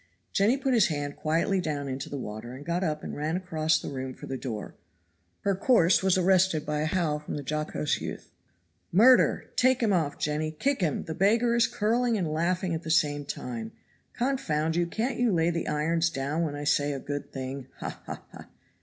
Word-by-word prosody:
He!" - - -39 0.2
Jenny 220 +6 +3
put 270 -1 0
his 225 -5 +5
hand 145 -2 -3
quietly 165 +5 +1
down 145 -4 -3
into 135 0 -4
the 140 - -4
water 115 0 -6
and 135 +3 -9
got 170 +2 -1
up 155 -3 -2
and - - -5
ran 155 +4 -1
across 160 -4 +1
the - - -5
room 130 -1 -5
for - - -10
the 135 - -4
door. 120 -5 -5 0.7
Her 200 - +1
course 190 -3 +4
was 190 -1 +3
arrested 185 -3 +3
by 150 0 -1
a 155 - 0
howl 155 -3 0
from 150 - -6
the 145 - -5
jocose 150 +1 -1
youth. - - -6 0.6
"Murder! 245 +8 +5
Take 255 0 +4
him 210 -3 +3
off, 160 -5 0
Jenny; 150 +1 -1
kick 270 - 0
him; 160 -5 0
the 160 - -5
beggar 225 +7 +3
is 235 -1 +4
curling 230 +2 +1
and 180 -5 -1
laughing 175 +2 0
at 160 - -2
the 160 - -7
same 145 -3 +2
time. 115 -5 -5 0.4
Confound 165 - 0
you, 175 0 +1
can't 230 +9 -2
you 245 -2 +3
lay 170 -1 +2
the 170 0 -3
irons 165 +3 +1
down 145 +1 -2
when 155 -3 -1
I 145 - -5
say 145 0 +2
a 135 - -4
good 145 +1 -5
thing. 130 0 -5
Ha! - - -6
Ha! - - -6
Ha!" - - -12
160 Hz, 210 wpm, -28 LUFS, 145-190 Hz, 0.7 s, his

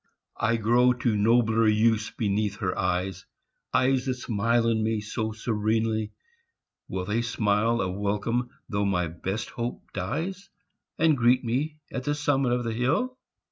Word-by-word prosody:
I 115 +1 +2
grow 120 +3 +4
to 120 -2 0
nobler 110 +1 +3
use 110 0 +3
beneath 105 -1 -1
her 100 -2 -2
eyes 90 +1 -2 0.4
Eyes 130 0 +2
that 130 - 0
smile 115 -1 +1
on 115 -1 +2
me 110 0 0
so 110 +1 -3
serenely, 110 0 -1 0.8
will 95 -1 -3
They 110 +4 0
smile 115 0 +1
a 95 -1 -1
welcome 105 +5 -1 0.2
though 100 -2 -1
my 90 -3 +1
best 95 +6 -4
hope 120 0 -5
dies, 185 +6 -3 0.5
And 160 -1 +4
greet 125 +1 +3
me 140 +6 -1
at 130 0 -4
the 145 - +1
summit 140 -4 +1
of 125 0 +1
the 115 -1 -2
hill? 160 - 0
115 Hz, 150 wpm, -26 LUFS, 105-125 Hz, 0.8 s, grow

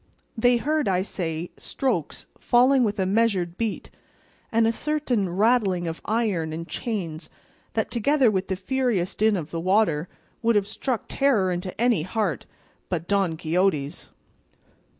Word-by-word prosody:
They 245 +1 +4
heard, 305 +4 0
I 185 -1 +2
say, 170 -3 -4
strokes 225 - -2
falling 255 +2 +4
with 210 -2 0
a 190 - +1
measured 190 -4 +1
beat, 225 +1 -3 0.6
and 230 0 +3
a 225 - +3
certain 255 -7 -1
rattling 195 -2 +2
of 165 0 -5
iron 205 -8 0
and 165 +1 -5
chains 180 -9 -4 0.4
that, - - -1
together 255 +1 +3
with 190 -1 -1
the 190 - -1
furious 200 -3 -1
din 215 0 +2
of 160 -3 -6
the 165 - -3
water, 180 -3 +2 0.3
would 230 -1 +2
have 205 -1 +3
struck 245 +3 -3
terror 230 -10 +2
into 180 +2 -4
any 235 -7 +3
heart 190 - -2 0.4
but 170 -2 -3
Don 195 -5 +1
Quixote's. 165 -3 0
200 Hz, 150 wpm, -25 LUFS, 175-235 Hz, 0.6 s, They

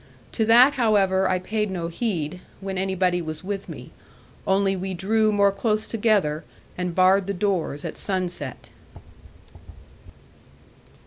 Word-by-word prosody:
To 220 - 0
that, 245 +5 +7
however, 190 -4 +3
I 185 - +2
paid 210 +3 -2
no 175 -3 -3
heed, 175 -3 -3 0.2
when 195 -1 -4
anybody 185 -2 0
was 155 0 -6
with 195 0 -5
me; 130 -6 -9 0.6
only 195 0 +2
we 190 0 -4
drew 215 +4 +1
more 200 -1 +3
close 215 +2 -1
together, 205 -9 +1 0.3
and 180 -2 -3
barred 185 +1 +4
the 200 - -2
doors 180 -7 -1
at - - -5
sunset. 175 - -3
190 Hz, 130 wpm, -24 LUFS, 180-205 Hz, 0.6 s, that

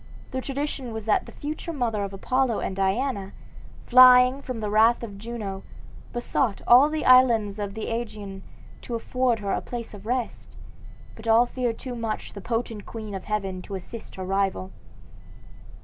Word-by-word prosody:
The 260 - -2
tradition 275 -3 -4
was 220 -1 -5
that 215 - +1
the - - -10
future 310 +3 -5
mother 235 -8 -1
of 200 - -4
Apollo 250 +4 0
and 190 - -3
Diana, 195 +1 -1 0.5
flying 255 +1 +7
from 255 -4 -5
the 210 -1 -3
wrath 225 +3 +4
of 200 -4 -7
Juno, 210 -4 -5 0.5
besought 240 -2 -1
all 255 +5 +7
the 310 0 -2
islands 230 -5 +5
of 200 -1 -4
the 220 - -4
Aegean 210 -4 -5 0.4
to 240 - -5
afford 250 +1 0
her 200 -1 -2
a - - 0
place 235 -2 -7
of 205 +1 -11
rest, 245 -1 -3 0.6
but 225 0 -10
all 225 +2 +6
feared 245 -2 -2
too 255 - -6
much 230 -2 -4
the 200 - -8
potent 225 -1 -3
queen 215 -3 -7
of 190 -1 -6
heaven 195 -3 -2
to 195 - -7
assist 215 +4 -9
her 185 - -5
rival. 190 - -1
225 Hz, 170 wpm, -25 LUFS, 200-250 Hz, 0.6 s, flying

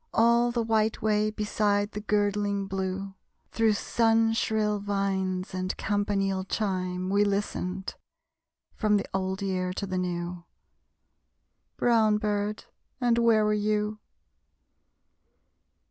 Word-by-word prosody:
All 235 +1 +4
the 235 -1 0
white 220 -1 +1
way 215 0 +2
beside 205 -1 0
the 210 - -5
girdling 205 -1 0
blue, 195 0 -3 0.4
Through 225 -1 +3
sun 225 +1 +2
shrill 215 -2 0
vines 195 -2 -1
and 185 0 -3
campanile 200 -2 0
chime, 185 -2 -2
We 200 +1 +4
listened; 195 -2 -2 0.8
from 210 -2 +2
the 200 - -2
old 190 +1 -2
year 185 -2 -1
to 200 - -3
the 185 -1 -2
new. 175 -1 -3 1.3
Brown 220 -3 +3
bird, 210 0 -2 0.3
and 240 -2 +2
where 225 -2 +4
were 210 - +2
you? 210 0 0
205 Hz, 115 wpm, -27 LUFS, 190-215 Hz, 1.3 s, All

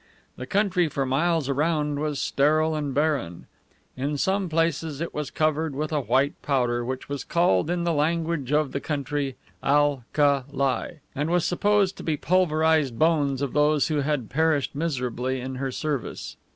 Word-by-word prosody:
The 125 - -7
country 190 -2 +2
for 140 -2 -2
miles 155 +3 +1
around 150 +1 0
was 150 -1 -2
sterile 155 +3 +2
and 150 -2 -2
barren. 140 - -1 0.5
In 140 +3 -2
some 190 +4 0
places 160 -2 0
it 170 - -4
was 150 -3 -3
covered 155 -1 0
with 150 +2 -3
a 150 - +1
white 140 +3 +1
powder, 120 -4 0
which 130 +2 -5
was 140 -2 -4
called 165 - +2
in 175 0 0
the 170 -1 +1
language 160 -2 0
of 150 -2 +2
the 140 - -2
country 140 -2 -2 0.3
AL 145 -2 +2
KA 140 -3 +3
LI, 140 +3 -1
and 150 +3 -2
was 175 -1 +2
supposed 200 +1 +2
to - - -8
be 160 - 0
the - - -14
pulverized 160 -7 +2
bones 145 -3 +2
of 135 - -3
those 150 +1 +3
who 155 - 0
had 145 -5 -1
perished 150 -1 +1
miserably 130 -4 -2
in 130 +1 -5
her 135 0 -2
service. 145 -1 -4
150 Hz, 175 wpm, -25 LUFS, 135-160 Hz, 0.5 s, KA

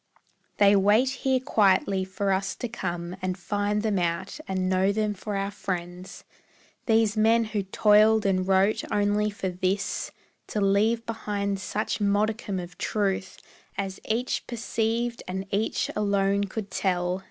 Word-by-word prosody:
They 200 0 +6
wait 210 +6 +4
here 265 0 0
quietly 195 -5 +2
for 195 +1 -2
us 190 0 0
to 245 - -4
come 175 -6 -4
And 185 0 -2
find 205 +3 -1
them 210 -4 +1
out, 175 - -2
and 185 -1 -1
know 190 +1 +2
them 210 0 0
for 205 +1 -5
our 195 0 -1
friends; 180 -2 -6 0.6
These 225 -2 +3
men 225 +2 +4
who 215 -2 -2
toiled 210 +2 +4
and 185 -1 +1
wrote 195 +2 +3
only 205 +1 +2
for 205 -2 -3
this, 185 +2 -1 0.4
To 210 - -2
leave 210 +4 +2
behind 205 -3 -2
such 210 +3 -3
modicum 205 0 0
of 175 0 -9
truth 195 -3 -1 0.4
As 195 -1 -3
each 235 +3 -1
perceived 235 0 -2
and 190 +1 -4
each 210 +3 0
alone 200 -1 +1
could 200 0 -6
tell. 180 -1 0
200 Hz, 145 wpm, -26 LUFS, 190-215 Hz, 0.6 s, They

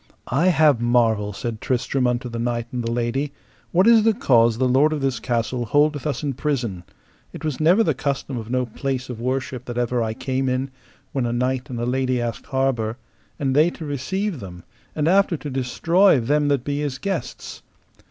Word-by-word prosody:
I 160 +8 +3
have 155 -8 +4
marvel, 115 -4 +2
said 110 +3 -5
Tristram 130 0 0
unto 125 +1 -1
the 115 -1 -5
knight 120 0 -1
and 125 -1 -3
the 115 - -2
lady, 120 +4 -1 0.4
what 185 +3 +4
is 230 -1 +7
the 220 0 +3
cause 115 - +3
the 130 +1 +2
lord 140 +5 +3
of 150 - -3
this 135 -2 0
castle 120 0 -1
holdeth 145 +4 +2
us 150 - -2
in 140 -2 -1
prison: 120 - -2 0.5
it - - -7
was 150 -4 -2
never 175 +8 +5
the 160 - +1
custom 140 0 -3
of 115 -2 -6
no 125 0 0
place 130 +2 -4
of 115 -2 -7
worship 130 0 -3
that 120 -2 -6
ever 120 0 0
I 110 -1 -2
came 130 +1 -1
in, 130 +1 -1 0.4
when 130 -3 -1
a - - -1
knight 125 +3 -1
and 120 -2 -4
a 120 - -1
lady 130 0 0
asked 120 -1 -4
harbour, 125 -4 0 0.4
and 135 -2 -1
they 155 +4 +5
to 165 - -8
receive 165 +6 -2
them, 90 -4 -9 0.3
and 150 0 0
after 185 -1 +3
to 145 -1 -7
destroy 165 +7 +3
them 145 +5 +1
that 140 -4 +1
be 145 +1 -2
his 145 -3 -2
guests. 195 +8 -5
130 Hz, 200 wpm, -22 LUFS, 120-145 Hz, 0.5 s, is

